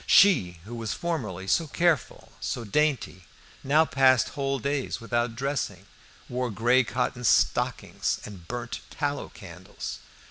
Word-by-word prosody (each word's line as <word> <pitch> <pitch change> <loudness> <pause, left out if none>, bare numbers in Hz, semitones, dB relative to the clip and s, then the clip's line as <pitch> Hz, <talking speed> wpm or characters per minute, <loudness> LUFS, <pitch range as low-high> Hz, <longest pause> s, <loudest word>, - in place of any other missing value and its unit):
She 95 - +5
who 115 - -8
was 115 -2 -3
formerly 110 - -3
so 160 - +2
careful, 170 0 0
so 120 - -3
dainty, 125 -7 0 0.4
now 150 +4 +4
passed 130 -1 +4
whole 135 -1 -1
days 140 +1 -2
without 120 0 -1
dressing, 125 -8 -2 0.4
wore 125 0 -2
grey 120 +5 +3
cotton 125 +1 -2
stockings, 115 - +1
and 95 -5 -10
burnt 120 -1 -4
tallow 145 0 -2
candles. 90 -1 -8
125 Hz, 130 wpm, -27 LUFS, 110-140 Hz, 0.4 s, She